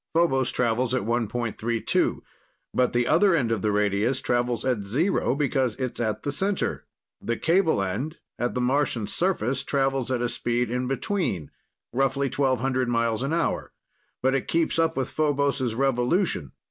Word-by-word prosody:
Phobos 135 -7 +3
travels 125 +1 +1
at 125 - 0
1.32, 115 0 -1 0.5
but 125 -1 +2
the 120 0 +1
other 175 +6 +4
end 120 -7 +1
of 110 -4 0
the 105 - +1
radius 105 +5 +1
travels 120 -1 0
at 125 -5 +1
zero 130 - +1
because 135 -5 0
it's 130 -2 -4
at 110 -2 -1
the 145 - -1
center. 195 +6 -1 0.4
The 115 0 -2
cable 165 - +2
end, 135 - -3 0.2
at 120 - -1
the 125 - 0
Martian 125 -3 +1
surface, 135 - 0
travels 135 -2 0
at 130 -2 0
a - - +2
speed 120 0 -1
in 125 +1 -1
between 135 - -2 0.4
roughly 135 +1 +1
1,200 130 -2 +1
miles 115 -1 +1
an 135 +3 -1
hour 165 0 -1 0.5
but 130 +1 +3
it 135 - -1
keeps 165 0 +1
up 165 -1 +1
with 130 -1 0
Phobos' 140 -5 0
revolution. 130 - +1
130 Hz, 160 wpm, -25 LUFS, 120-140 Hz, 0.5 s, other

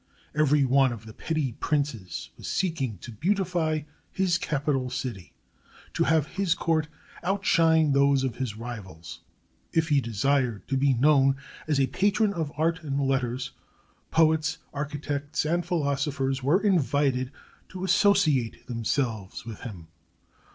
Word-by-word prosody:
Every 150 -2 +3
one 135 0 +4
of 115 -1 -7
the 110 - -10
petty 155 -2 -2
princes 125 - -2
was - - -9
seeking 150 - -1
to 120 - -8
beautify 170 - 0 0.3
his 185 -2 +1
capital 140 -5 -1
city, 115 -9 -5 0.6
to - - +1
have 160 -3 +3
his 185 0 0
court 160 -2 0 0.3
outshine 165 -5 +3
those 140 -1 +4
of 130 -4 -2
his 120 -5 -3
rivals. 100 -8 -8 0.5
If 160 -1 +1
he 145 -2 +4
desired 120 0 0
to 135 - +1
be 135 0 +3
known 135 +1 +4 0.3
as 150 -3 +1
a 135 - +4
patron 205 - +1
of 160 -5 -3
art 165 +1 +1
and 140 -3 -2
letters, 130 -2 -1 0.6
poets, 160 0 +3 0.2
architects, 145 0 -3
and 170 +3 +1
philosophers 140 -5 -1
were 160 +10 +2
invited 140 -8 +2 0.4
to 185 0 -7
associate 185 - +2
themselves 115 -4 -2
with 115 -2 -7
him. 95 -9 -8
140 Hz, 135 wpm, -27 LUFS, 125-160 Hz, 0.6 s, one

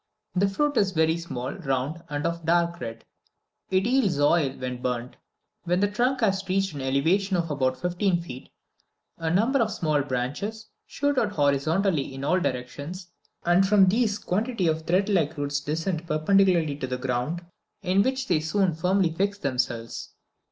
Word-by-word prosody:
The 195 +2 +3
fruit 290 +7 0
is 195 -2 +2
very 160 -1 +3
small, 130 -7 -5
round, 145 -1 -2
and 145 +1 -3
of 170 0 -1
a - - -13
dark 170 0 +2
red; 115 -2 -7 0.6
it 190 +1 +2
yields 230 - +2
oil 145 0 +4
when 125 -1 -5
burnt. 125 0 -3 0.5
When 180 +1 +1
the 205 - +3
trunk 250 +5 +1
has 195 -3 +2
reached 195 -1 +1
an 140 - -5
elevation 165 +9 +1
of 165 -2 -1
about 130 -3 0
fifteen 180 +2 +1
feet, 130 -7 -9 0.7
a 165 -1 -1
number 225 +11 +2
of 220 -1 +1
small 155 -7 +1
branches 145 - -3 0.2
shoot 285 -1 0
out 210 -2 0
horizontally 145 +1 +1
in 135 - -6
all 180 +6 +2
directions, 145 +6 -4 0.3
and 175 +2 +5
from 200 -1 +6
these 215 0 +1
quantity 215 +1 -1
of 160 -1 0
threadlike 180 -4 +1
roots 145 0 -1
descend 165 +3 -3
perpendicularly 165 -1 +3
to 130 - -4
the 125 0 -2
ground, 130 +7 -2 0.4
in 190 +1 +3
which 260 +3 0
they 170 -4 +2
soon 180 +3 +1
firmly 180 +2 +1
fix 200 +4 0
themselves. 125 -7 -3
170 Hz, 165 wpm, -26 LUFS, 145-195 Hz, 0.7 s, from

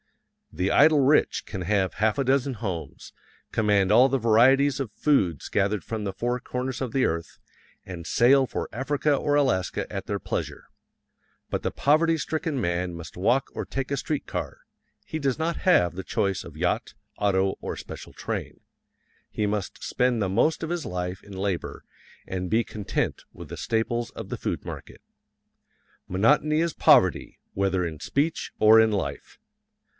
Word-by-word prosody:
The 95 +2 0
"idle 150 0 +6
rich" 140 +2 +3
can 95 - -6
have 95 +1 0
half 110 +3 +1
a 140 - +1
dozen 135 0 +1
homes, 90 - -6 0.4
command 105 -3 +2
all 125 +5 +6
the 135 - +1
varieties 130 +5 +4
of 130 -6 -3
foods 100 - +1
gathered 100 +1 0
from 110 -2 -4
the 100 - -2
four 120 +6 -2
corners 125 +1 -4
of 130 -3 -2
the 130 +2 +2
earth, 85 0 -3 0.5
and 85 -3 -8
sail 130 +6 +4
for - - -4
Africa 145 +3 0
or 145 +1 0
Alaska 130 -11 0
at - - -5
their - - -2
pleasure; - - -4 0.8
but - - -1
the - - -2
poverty 160 +3 +3
stricken 155 -1 -2
man 85 -3 -1
must 85 -1 -9
walk 120 +9 +2
or - - -3
take 135 0 -4
a - - +2
street 145 +2 -3
car - - -5 0.4
he 160 - -4
does 135 -3 0
not 165 +1 -1
have 90 - +3
the 95 +2 -6
choice 95 0 -1
of - - -11
yacht, - - -1 0.2
auto, 95 -1 +2
or - - -5
special - - -9
train. - - -5 0.7
He 105 - -2
must 105 -3 -3
spend 125 -2 +1
the 100 - +1
most 155 - +1
of 160 - -3
his 175 -3 -2
life 90 +1 -4
in 100 - -14
labor 95 -2 -3 0.4
and 90 -1 -3
be 115 +1 +2
content 105 -2 -3
with - - -11
the - - -6
staples 115 +1 -1
of - - -8
the - - -4
food - - -4
market. - - -8 1.1
Monotony 150 +11 +3
is 170 -1 0
poverty, - - +4 0.2
whether 95 -2 0
in 80 -3 -5
speech 150 - -1
or 110 +1 +7
in 110 -1 +3
life. 100 -2 -4
115 Hz, 170 wpm, -26 LUFS, 95-140 Hz, 1.1 s, or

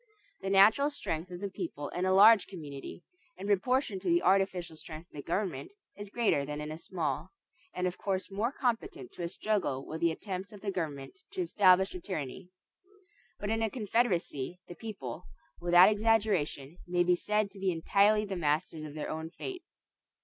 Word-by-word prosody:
The 195 - -3
natural 210 +9 +6
strength 165 - -4
of 180 0 -8
the 200 - -2
people 165 -7 -5
in 180 - -2
a 185 - +2
large 205 +2 +7
community, 150 -2 -8 0.3
in 195 - -7
proportion 205 +1 +1
to 185 - -2
the 345 0 +3
artificial 185 -3 +2
strength 160 +2 -9
of - - -34
the 145 - -5
government, 200 - -3 0.2
is 205 0 -8
greater 215 -10 +1
than 150 +1 -5
in 150 0 -5
a 155 - -6
small, 160 -7 -3 0.5
and 180 - -1
of 180 0 -2
course 190 -1 -2
more 215 +6 0
competent 285 - -2
to - - -9
a 170 - -2
struggle 185 -10 -1
with 160 +1 -6
the 170 - +4
attempts 190 +3 -5
of 205 - -11
the 200 - -2
government 155 - -5
to 380 - -2
establish 190 - +4
a 180 - -5
tyranny. 175 -1 -5 0.9
But 205 - -2
in 225 0 0
a 225 - +1
confederacy 190 - -1
the - - -8
people, 175 - -7 0.3
without 175 +1 +7
exaggeration, 205 -9 +1
may 175 0 +2
be 180 0 +4
said 210 +2 0
to 195 - -13
be 190 -1 +1
entirely 200 +5 +3
the 195 -2 -4
masters 155 0 0
of 155 -1 -8
their 155 - -4
own 160 +1 -4
fate. 365 - -7
185 Hz, 185 wpm, -31 LUFS, 165-210 Hz, 0.9 s, large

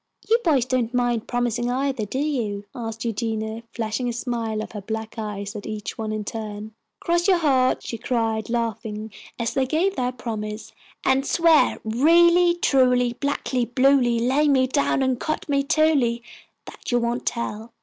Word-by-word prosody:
"You 460 +2 +4
boys 280 -7 +3
don't 255 -2 -1
mind 240 -2 0
promising, 240 0 -1
either, 260 -2 -1
do 210 - -5
you?" 235 -9 -2
asked 225 -1 -5
Eugenia, 220 0 -2
flashing 230 +2 -2
a - - -3
smile 230 -3 -3
of - - -9
her 210 - -6
black 220 +2 -5
eyes 205 -1 -5
at 205 - -6
each 215 -1 -5
one 220 -1 -4
in 215 -1 -3
turn. 215 -1 -6 0.3
"Cross 345 +1 +1
your 375 -2 +5
hearts," 265 -6 +2
she 230 - -5
cried, 225 -3 -1
laughing, 220 -2 -3 0.3
as 235 -1 -2
they 265 -1 +1
gave 350 +8 +1
their 250 0 -1
promise, 215 -3 -6 0.3
"and 270 +1 +3
swear 330 +1 +4
'Really 340 +9 +4
truly, 250 -6 +3
blackly, 265 -1 -1
bluely, 260 -3 +4
lay 265 +6 +2
me 265 -2 +4
down 270 0 +1
and 260 -2 0
cut 310 - -3
me 280 -2 +1
in 275 - -2
twoly,' 275 -8 +2 0.4
that - - -8
you 245 - +3
won't 240 +1 -2
tell." 230 -1 -3
240 Hz, 170 wpm, -23 LUFS, 220-270 Hz, 0.4 s, your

